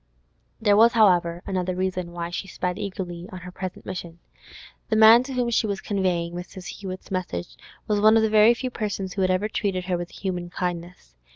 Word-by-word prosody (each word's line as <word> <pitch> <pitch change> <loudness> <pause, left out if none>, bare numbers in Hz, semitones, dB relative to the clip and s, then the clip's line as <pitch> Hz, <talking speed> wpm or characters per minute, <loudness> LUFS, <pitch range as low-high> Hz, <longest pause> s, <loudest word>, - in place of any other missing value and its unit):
There 210 -2 +4
was, 230 +3 +6
however, 175 -6 +3
another 185 -1 -2
reason 185 -1 -2
why 170 0 -5
she 190 - -4
sped 180 0 -3
eagerly 185 -3 -5
on 185 - -8
her 180 +1 -9
present 185 0 -7
mission. 170 -2 -6 0.7
The 220 - +2
man 220 +2 +8
to 265 +1 -6
whom 245 -2 0
she 220 -1 +2
was 200 -2 -2
conveying 180 -5 -1
Mrs. 180 +1 -8
Hewett's 190 -2 -7
message 180 - -4 0.3
was 210 -1 0
one 215 +1 +6
of 220 - +3
the 220 - +2
very 215 +2 +6
few 255 +1 -4
persons 200 -5 -3
who 195 - -2
had 185 - +2
ever 185 +3 +1
treated 195 -4 -2
her 180 -2 -1
with 175 0 -5
human 180 -3 -4
kindness. 175 - -5
185 Hz, 200 wpm, -24 LUFS, 175-210 Hz, 0.7 s, man